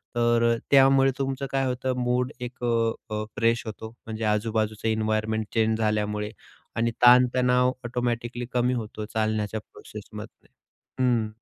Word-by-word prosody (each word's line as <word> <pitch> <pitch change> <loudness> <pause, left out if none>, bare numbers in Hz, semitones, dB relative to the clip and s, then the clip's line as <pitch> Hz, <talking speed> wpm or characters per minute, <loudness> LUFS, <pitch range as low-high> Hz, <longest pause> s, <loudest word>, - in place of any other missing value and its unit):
तर 120 0 +3
त्यामुळे 135 -1 +6
तुमचं 135 0 -2
काय 135 0 +1
होतं, 130 0 -1
मूड 125 +1 0
एक 125 0 -7
अ, 115 -1 +2 0.2
अ 105 - -2
फ्रेश 115 +1 +1
होतो. 110 0 -7 0.2
म्हणजे 110 0 -5
आजूबाजूचं 110 0 0
इन्व्हायर्नमेंट 110 0 0
चेंज 110 -1 +2
झाल्यामुळे 105 -1 -1 0.5
आणि 115 +1 +1
ताणतणाव 125 +1 +5
ऑटोमॅटिकली 120 0 -2
कमी 125 +1 +2
होतो 110 -2 -5
चालण्याच्या 110 -1 -1
प्रोसेसमधनं, - - -11 0.6
हं. 120 -3 +2
115 Hz, 125 wpm, -26 LUFS, 110-125 Hz, 0.6 s, त्यामुळे